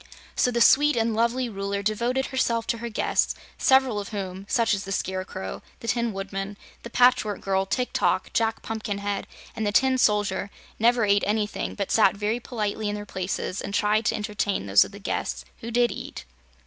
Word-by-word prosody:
So - - +3
the 235 -1 0
sweet 295 +5 +6
and 225 -1 +1
lovely 235 +3 +1
Ruler 200 -2 -3
devoted 240 +5 0
herself 235 -4 0
to 230 - -1
her 235 +1 -4
guests, 215 - +1 0.2
several 265 -5 +4
of 200 - -6
whom, 195 -2 -5
such 230 -3 +2
as 200 -1 -1
the 195 - -7
Scarecrow, 185 - -4 0.2
the 230 - -9
Tin 235 -1 +1
Woodman, 195 0 -5 0.2
the 235 - -8
Patchwork 245 -4 +3
Girl, 195 0 0
Tik 250 +5 -1
Tok, - - +1
Jack 225 -1 0
Pumpkinhead 205 -2 -3 0.3
and 220 - -3
the - - +1
Tin 260 +4 +3
Soldier, 205 -3 +2 0.3
never 235 0 +4
ate 200 0 +3
anything 210 0 -1
but 200 -2 -3
sat 220 - +4
very 210 +3 -1
politely 215 -3 -3
in 205 - -2
their 205 0 -6
places 185 -1 -3
and 200 - -4
tried 215 +2 +2
to - - +2
entertain 210 - -2
those 100 0 +6
of - - -9
the 200 - -10
guests 200 - -3
who 230 - -6
did 240 0 +2
eat. - - -7
215 Hz, 190 wpm, -25 LUFS, 200-235 Hz, 0.3 s, sweet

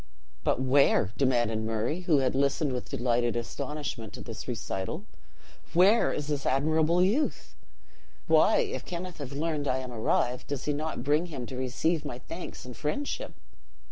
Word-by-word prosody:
"But - - +2
where," 130 -6 +4
demanded 120 -5 +2
Murray, 110 +8 -1
who 175 -4 +3
had 130 -2 +2
listened 140 +1 +1
with 125 - -4
delighted 120 0 +1
astonishment 120 -1 -4
to - - -7
this - - -7
recital, 95 - -3 0.7
"where 195 +6 +5
is 150 - -2
this 145 -2 -2
admirable 155 +6 +3
youth? 235 +11 0 0.7
Why, - - +5
if 460 -1 -3
Kenneth 180 -1 -6
have 140 -2 -6
learned 150 0 -1
I 130 - +2
am 130 -1 -5
arrived, 120 +2 0
does 140 -2 -3
he 150 - +1
not 155 -3 -3
bring 150 +5 +2
him 135 -7 -5
to 130 - -7
receive 140 +6 0
my 120 - -5
thanks 165 +4 -8
and 125 -1 -8
friendship?" 285 - -3
140 Hz, 160 wpm, -29 LUFS, 125-160 Hz, 0.7 s, where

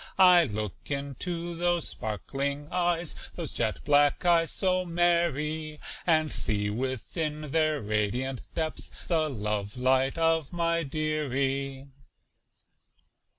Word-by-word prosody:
I 180 -2 +7
look 105 -4 -3 0.2
into 165 +5 -3
those 175 -1 +1
sparkling 140 +7 -3
eyes, 175 -2 0 0.2
Those - - -2
jet - - -1
black 145 +3 +4
eyes 170 -1 +4
so 185 -1 +1
merry, 160 -3 0 0.3
And 155 -2 +3
see 105 -1 0
within 145 - -3
their 155 -1 +2
radiant 110 +5 -1
depths 160 -1 -3 0.2
The 160 -3 +1
love 105 -3 -3
light 130 +3 +2
of 165 -3 +2
my 170 -1 +1
"dearie." 140 -3 -1
150 Hz, 110 wpm, -28 LUFS, 130-170 Hz, 0.3 s, I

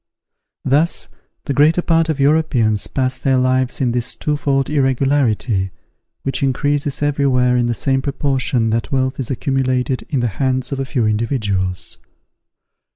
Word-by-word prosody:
Thus, 150 +6 +1 0.4
the 140 - -1
greater 155 +5 +3
part 165 -1 +2
of 155 -3 -1
Europeans 135 -8 +2
pass 130 -1 -1
their 135 -1 +2
lives 130 0 +1
in 125 -3 +1
this 120 0 -1
twofold 140 -2 0
irregularity, 130 -7 +1 0.5
which 135 - -2
increases 145 +2 0
everywhere 135 -4 +2
in 120 -1 +2
the 120 - -1
same 135 +3 0
proportion 130 -4 0
that 115 -2 -2
wealth 130 -1 0
is 130 - -4
accumulated 130 -1 -1
in 140 -6 0
the 120 - +1
hands 130 -1 0
of 135 - -3
a 135 - -1
few 130 -3 -1
individuals. 105 -5 -1
130 Hz, 145 wpm, -18 LUFS, 125-140 Hz, 0.5 s, greater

